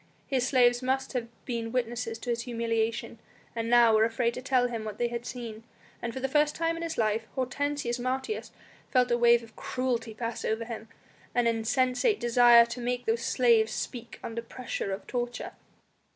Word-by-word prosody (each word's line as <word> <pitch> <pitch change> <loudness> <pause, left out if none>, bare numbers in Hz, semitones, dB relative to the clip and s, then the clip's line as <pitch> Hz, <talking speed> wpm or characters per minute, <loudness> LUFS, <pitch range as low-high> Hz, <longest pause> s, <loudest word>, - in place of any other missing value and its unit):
His 255 -2 0
slaves 245 -2 +4
must 265 +1 -1
have 245 -2 -2 0.2
been 230 -2 -3
witnesses 240 -2 -2
to 240 +2 -4
his 235 0 -1
humiliation, 230 -1 -2 0.4
and 230 0 -2
now 240 -1 +6
were 215 0 +5
afraid 230 +1 +1
to 250 - -6
tell 255 -1 +2
him 230 -3 -4
what 215 -1 -6
they 240 0 0
had 235 +1 -5
seen; 230 -3 -7 0.4
and 235 - -3
for 260 - -5
the 265 - -1
first 295 +2 +2
time 330 0 0
in 330 - -6
his 335 -1 -4
life 220 0 0
Hortensius 265 -1 -1
Martius 260 - -3 0.4
felt 250 -2 +3
a 240 - +4
wave 235 0 +5
of 225 -1 -15
cruelty 240 -4 -2
pass 230 0 -4
over 220 +1 -1
him, 225 -1 -7 0.5
in 245 -1 +3
an 230 0 +3
insensate 255 - +1
desire 240 0 +7
to 235 - -6
make 245 0 -2
the 225 - +2
slaves 230 -2 +3
speak 240 -1 -5
under 230 0 -4
pressure 235 -4 -5
of 195 - -5
torture. 245 -1 -3
240 Hz, 190 wpm, -28 LUFS, 230-255 Hz, 0.5 s, desire